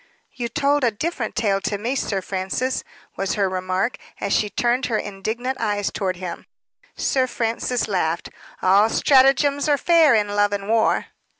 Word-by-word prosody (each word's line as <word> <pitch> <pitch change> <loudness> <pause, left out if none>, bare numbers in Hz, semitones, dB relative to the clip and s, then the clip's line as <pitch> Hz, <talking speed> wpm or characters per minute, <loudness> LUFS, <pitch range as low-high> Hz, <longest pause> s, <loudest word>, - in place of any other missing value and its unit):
"You 240 -2 -4
told 280 +4 +1
a 240 - +4
different 240 +1 -4
tale 200 -3 +1
to 205 - -2
me, 235 +6 -2
Sir 195 -7 -2
Francis," 195 +8 -2 0.3
was 195 - -1
her 200 -2 +1
remark, 185 +4 -2 0.2
as 200 - -1
she 210 - +1
turned 240 +5 0
her 225 - 0
indignant 220 +7 -4
eyes 205 -2 -1
toward 190 -3 -2
him. 175 -1 -7 0.5
Sir 260 -1 +1
Francis 235 +1 -1
laughed. 170 -5 -1 0.3
"All 200 +4 +5
stratagems 280 +3 +3
are 290 - +4
fair 325 -4 +5
in 210 -1 +1
love 205 0 +1
and 200 -1 -3
war." 225 0 +2
220 Hz, 165 wpm, -22 LUFS, 195-255 Hz, 0.5 s, All